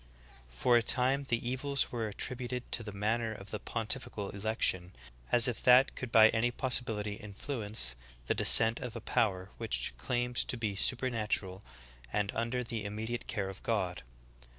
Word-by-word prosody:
For 120 Hz, -, +2 dB
a -, -, +3 dB
time 130 Hz, +4 st, +2 dB
the 120 Hz, 0 st, -1 dB
evils 135 Hz, +2 st, -1 dB
were 115 Hz, -2 st, -3 dB
at 100 Hz, -, -11 dB
tributed 125 Hz, -1 st, -2 dB
to 115 Hz, -, +1 dB
the 105 Hz, -2 st, -7 dB
manner 110 Hz, +3 st, -1 dB
of 100 Hz, -1 st, -10 dB
the 105 Hz, -, -4 dB
pontifical 110 Hz, -1 st, -3 dB
election, 100 Hz, -3 st, 0 dB, 0.4 s
as 120 Hz, 0 st, +6 dB
if 125 Hz, -, -3 dB
that 125 Hz, +2 st, +5 dB
could 130 Hz, -3 st, -6 dB
by 110 Hz, -1 st, +7 dB
any 115 Hz, +2 st, +1 dB
possibility 115 Hz, -5 st, -1 dB
influence 105 Hz, -, -1 dB, 0.3 s
the -, -, +1 dB
descent 110 Hz, +2 st, +6 dB
of 120 Hz, -2 st, -7 dB
a -, -, -4 dB
power 100 Hz, -5 st, -1 dB
which -, -, -2 dB
claimed 120 Hz, -, -2 dB
to 125 Hz, -, +1 dB
be 110 Hz, -4 st, -2 dB
supernatural 105 Hz, -5 st, 0 dB, 0.5 s
and 100 Hz, +3 st, -1 dB
under 115 Hz, +2 st, -2 dB
the 115 Hz, -2 st, -5 dB
immediate 110 Hz, +3 st, -5 dB
care 95 Hz, -2 st, -3 dB
of 95 Hz, 0 st, -9 dB
God. 95 Hz, -6 st, -2 dB
115 Hz, 165 wpm, -31 LUFS, 105-125 Hz, 0.5 s, by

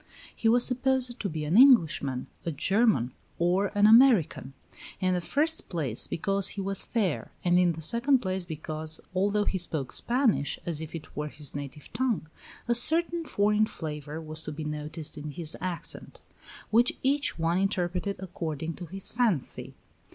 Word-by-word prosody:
He 225 Hz, -, +1 dB
was 240 Hz, +1 st, +5 dB
supposed 255 Hz, -1 st, +1 dB
to 200 Hz, -, -2 dB
be 155 Hz, -2 st, -4 dB
an 155 Hz, +5 st, 0 dB
Englishman, 165 Hz, -, +5 dB, 0.2 s
a 170 Hz, -, -2 dB
German, 175 Hz, -, +2 dB, 0.3 s
or 180 Hz, +4 st, +2 dB
an 205 Hz, -, +5 dB
American; 220 Hz, -, +5 dB, 0.5 s
in 185 Hz, 0 st, +1 dB
the 180 Hz, -, 0 dB
first 310 Hz, -, +1 dB
place, 140 Hz, -, 0 dB
because 195 Hz, +2 st, 0 dB
he -, -, -2 dB
was 195 Hz, 0 st, -1 dB
fair, 200 Hz, -9 st, -2 dB
and 175 Hz, 0 st, +4 dB
in 175 Hz, -2 st, +3 dB
the 160 Hz, 0 st, -8 dB
second 235 Hz, -, +3 dB
place, 190 Hz, -5 st, -3 dB
because, 155 Hz, -1 st, -4 dB
although 205 Hz, +3 st, +1 dB
he 190 Hz, -, -1 dB
spoke 155 Hz, -7 st, -2 dB
Spanish 240 Hz, -, +1 dB
as 160 Hz, -3 st, -3 dB
if 160 Hz, +1 st, -7 dB
it 160 Hz, -1 st, -10 dB
were 150 Hz, +1 st, -3 dB
his 150 Hz, -2 st, -5 dB
native 145 Hz, +1 st, -8 dB
tongue, 230 Hz, -7 st, -1 dB, 0.4 s
a 240 Hz, -, +3 dB
certain 330 Hz, +7 st, +4 dB
foreign 210 Hz, -2 st, +2 dB
flavor 150 Hz, -3 st, -6 dB
was 155 Hz, 0 st, -3 dB
to -, -, -4 dB
be 155 Hz, +1 st, -6 dB
noticed 150 Hz, +1 st, -5 dB
in 150 Hz, +1 st, -6 dB
his 155 Hz, +2 st, -4 dB
accent, 180 Hz, -2 st, -5 dB, 0.5 s
which 235 Hz, +3 st, +3 dB
each 280 Hz, +2 st, +1 dB
one 165 Hz, +2 st, +1 dB
interpreted 190 Hz, 0 st, -1 dB
according 165 Hz, -4 st, -5 dB
to 175 Hz, 0 st, -9 dB
his 190 Hz, +3 st, -3 dB
fancy. 225 Hz, -, -1 dB
180 Hz, 165 wpm, -28 LUFS, 155-225 Hz, 0.5 s, was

